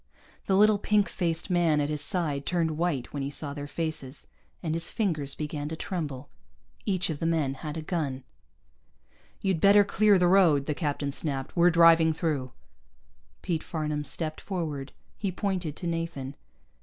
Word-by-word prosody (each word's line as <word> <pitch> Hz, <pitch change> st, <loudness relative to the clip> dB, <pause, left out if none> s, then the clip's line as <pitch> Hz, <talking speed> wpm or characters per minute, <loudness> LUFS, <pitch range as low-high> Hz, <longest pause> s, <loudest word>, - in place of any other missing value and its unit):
The 190 Hz, -, +3 dB
little 210 Hz, 0 st, +5 dB
pink 210 Hz, 0 st, +2 dB
faced 170 Hz, +1 st, -2 dB
man 170 Hz, -4 st, +3 dB
at 145 Hz, 0 st, 0 dB
his 150 Hz, -1 st, -2 dB
side 150 Hz, -3 st, -1 dB
turned 170 Hz, -3 st, +1 dB
white 155 Hz, -5 st, -2 dB
when 145 Hz, -, -3 dB
he 135 Hz, -, -2 dB
saw 145 Hz, 0 st, -4 dB
their 145 Hz, 0 st, -6 dB
faces, 150 Hz, -3 st, -4 dB, 0.4 s
and 160 Hz, -2 st, -1 dB
his 165 Hz, +1 st, -1 dB
fingers 155 Hz, -, -1 dB
began 150 Hz, -1 st, -4 dB
to 160 Hz, -, -4 dB
tremble. 150 Hz, -6 st, -4 dB, 0.6 s
Each 185 Hz, -4 st, +1 dB
of 150 Hz, -, -5 dB
the 165 Hz, -, 0 dB
men 155 Hz, -5 st, +1 dB
had 150 Hz, +3 st, -6 dB
a 160 Hz, -, -4 dB
gun. 145 Hz, -7 st, -2 dB, 1.2 s
"You'd 190 Hz, -4 st, +1 dB
better 200 Hz, +1 st, +7 dB
clear 205 Hz, 0 st, +4 dB
the 180 Hz, -, +3 dB
road," 175 Hz, -7 st, +5 dB
the 150 Hz, -, -1 dB
captain 145 Hz, -2 st, -2 dB
snapped. 135 Hz, -2 st, -3 dB
"We're 175 Hz, 0 st, +6 dB
driving 165 Hz, -1 st, +6 dB
through." 150 Hz, -6 st, -2 dB, 0.9 s
Pete 165 Hz, -3 st, -1 dB
Farnam 150 Hz, -2 st, -2 dB
stepped 155 Hz, +1 st, -3 dB
forward. 155 Hz, -8 st, -4 dB, 0.3 s
He 200 Hz, -3 st, -1 dB
pointed 180 Hz, -5 st, -2 dB
to -, -, -7 dB
Nathan. 165 Hz, -5 st, -3 dB
160 Hz, 170 wpm, -28 LUFS, 145-175 Hz, 1.2 s, better